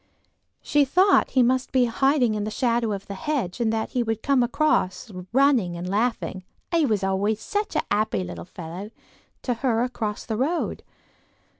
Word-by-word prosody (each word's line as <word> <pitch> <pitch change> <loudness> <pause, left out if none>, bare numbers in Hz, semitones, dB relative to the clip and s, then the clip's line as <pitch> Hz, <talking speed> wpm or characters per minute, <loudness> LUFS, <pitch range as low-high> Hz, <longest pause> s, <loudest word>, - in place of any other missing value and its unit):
She 295 -1 +3
thought 365 +9 +4
he 255 - +3
must 255 +2 +1
be 255 -2 +4
hiding 255 0 +2
in 210 -1 -2
the 215 - -2
shadow 235 0 0
of 200 -1 -4
the 200 - -6
hedge, 240 -2 -2
and 225 -2 +2
that 220 0 -2
he 250 - 0
would 225 -2 -2
come 270 -3 +3 0.9
running 250 -9 +3
and 175 +1 -5
laughing—"he 230 - -1
was 210 -4 0
always 200 +3 0
such 415 - -3
a - - +1
happy 210 -3 +1
little 180 - -7
fellow"—to 185 +8 -8
her 235 -1 0
across 225 -4 -3
the 220 -2 -3
road. 305 +8 -1
230 Hz, 160 wpm, -24 LUFS, 205-260 Hz, 0.9 s, thought